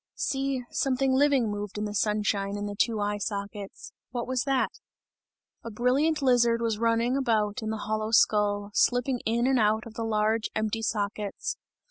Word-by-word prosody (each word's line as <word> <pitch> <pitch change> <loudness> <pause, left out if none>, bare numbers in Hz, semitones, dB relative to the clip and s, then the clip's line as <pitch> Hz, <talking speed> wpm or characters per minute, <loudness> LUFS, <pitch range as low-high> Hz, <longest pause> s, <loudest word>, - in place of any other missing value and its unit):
See, 270 -1 -1
something 265 0 +1
living 265 -5 +3
moved 205 0 -5
in 210 - -2
the 205 - -4
sunshine 205 -1 0
in 205 - -4
the 205 - -4
two 220 +1 +1
eye 205 0 -1
sockets; 200 -1 -6 0.2
what 240 -1 -3
was 255 0 -1
that? 270 -2 +1 0.9
A 230 - -6
brilliant 270 +7 +1
lizard 235 -3 +4
was 225 -2 -1
running 230 +2 +2
about 225 -4 0
in 220 - -3
the 220 - -2
hollow 215 0 -1
skull, 205 -2 +2
slipping 245 +2 +2
in 235 +2 +1
and 260 -1 +3
out 215 +1 +2
of 230 - -10
the 230 - -4
large, 220 0 +1
empty 220 +1 -1
sockets. 205 -1 -2
225 Hz, 170 wpm, -27 LUFS, 210-250 Hz, 0.9 s, lizard